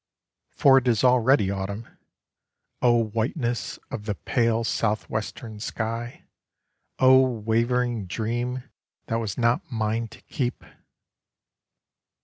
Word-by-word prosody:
For 135 Hz, -1 st, +5 dB
it 130 Hz, -, -6 dB
is 115 Hz, -1 st, +2 dB
already 125 Hz, -4 st, +4 dB
autumn, 100 Hz, +3 st, -4 dB, 0.9 s
O 120 Hz, -2 st, +4 dB
whiteness 115 Hz, +3 st, -2 dB
of 105 Hz, -, -5 dB
the 105 Hz, -2 st, -2 dB
pale 115 Hz, +2 st, +1 dB
southwestern 110 Hz, 0 st, -2 dB
sky! 115 Hz, +2 st, -4 dB, 0.7 s
O 130 Hz, 0 st, +7 dB
wavering 120 Hz, -1 st, 0 dB
dream 120 Hz, +5 st, -2 dB, 0.4 s
that 115 Hz, -, -1 dB
was 110 Hz, -3 st, -4 dB
not 120 Hz, 0 st, +1 dB
mine 110 Hz, 0 st, -1 dB
to -, -, -15 dB
keep! 125 Hz, -3 st, -3 dB
115 Hz, 105 wpm, -25 LUFS, 110-125 Hz, 0.9 s, O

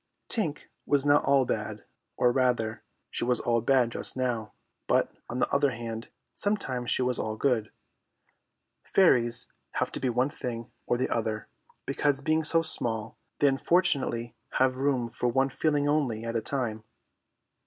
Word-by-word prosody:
Tink 165 Hz, -10 st, 0 dB, 0.2 s
was 145 Hz, -1 st, +3 dB
not 145 Hz, 0 st, +5 dB
all 135 Hz, -2 st, +4 dB
bad; -, -, -3 dB, 0.3 s
or, 125 Hz, -, +4 dB
rather, 120 Hz, -3 st, +1 dB, 0.3 s
she -, -, -2 dB
was 125 Hz, 0 st, +1 dB
all 115 Hz, -1 st, +1 dB
bad 125 Hz, -1 st, +3 dB
just -, -, -3 dB
now, 120 Hz, -4 st, -2 dB, 0.3 s
but, -, -, +2 dB, 0.2 s
on 120 Hz, -, -3 dB
the -, -, +2 dB
other 140 Hz, 0 st, +4 dB
hand, 115 Hz, -2 st, -6 dB, 0.2 s
sometimes 135 Hz, -13 st, -1 dB
she -, -, +3 dB
was 125 Hz, -1 st, 0 dB
all 110 Hz, 0 st, -2 dB
good. 115 Hz, -3 st, 0 dB, 1.1 s
Fairies 125 Hz, -10 st, +3 dB, 0.3 s
have -, -, -1 dB
to -, -, -5 dB
be 130 Hz, -, 0 dB
one 125 Hz, +4 st, +1 dB
thing 120 Hz, -4 st, -5 dB, 0.2 s
or 120 Hz, -, +2 dB
the 130 Hz, -, -1 dB
other, 110 Hz, -2 st, -2 dB, 0.4 s
because 140 Hz, 0 st, +1 dB
being 155 Hz, +2 st, +1 dB
so 165 Hz, +2 st, +3 dB
small 115 Hz, -8 st, -1 dB, 0.2 s
they 145 Hz, -, +4 dB
unfortunately 135 Hz, -5 st, +2 dB, 0.2 s
have 130 Hz, 0 st, +2 dB
room 130 Hz, -3 st, +1 dB
for 120 Hz, +1 st, -2 dB
one 135 Hz, +3 st, +2 dB
feeling 145 Hz, +1 st, +1 dB
only 130 Hz, -7 st, 0 dB
at 115 Hz, 0 st, -3 dB
a 115 Hz, -, +1 dB
time. 110 Hz, -4 st, -3 dB
125 Hz, 160 wpm, -28 LUFS, 115-140 Hz, 1.1 s, not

